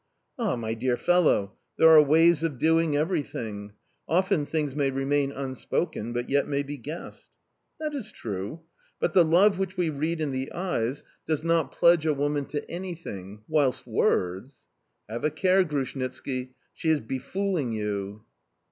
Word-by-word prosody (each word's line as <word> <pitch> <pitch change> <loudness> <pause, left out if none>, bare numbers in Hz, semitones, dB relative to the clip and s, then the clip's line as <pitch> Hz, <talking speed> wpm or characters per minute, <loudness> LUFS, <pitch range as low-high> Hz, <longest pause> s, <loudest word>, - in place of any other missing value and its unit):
"Ah, 220 - +1
my 110 -2 -3
dear 120 +2 0
fellow! 165 - +2 0.2
There 160 - +7
are 160 -1 +9
ways 160 +2 +4
of 165 -5 -2
doing 160 0 +2
everything; 115 - -3 0.3
often 180 -3 +1
things 150 -4 -2
may 140 -2 +1
remain 135 +1 0
unspoken, 130 -2 -3
but 120 0 -3
yet 140 0 +1
may 140 -1 0
be 145 +1 -6
guessed"... 150 +6 -8 0.5
"That 305 -1 -3
is 230 -7 -5
true... 105 - -5 0.4
But 160 - 0
the 180 - +7
love 185 +4 +4
which 190 0 -3
we 175 -3 +1
read 155 +3 -2
in 150 -3 -1
the 130 0 -3
eyes 145 -8 -2 0.2
does 155 -1 0
not 165 -1 +1
pledge 170 -2 +4
a 150 - +2
woman 145 0 0
to 145 +1 -5
anything, 130 - -7
whilst 145 -5 +1
words... 95 +10 -1 0.4
Have 115 +2 -5
a 150 - +3
care, 185 +5 +3
Grushnitski, 130 -3 -4 0.2
she 160 - -2
is 155 -2 +3
befooling 145 - -2
you!" 105 -1 -3
145 Hz, 155 wpm, -27 LUFS, 125-165 Hz, 0.5 s, are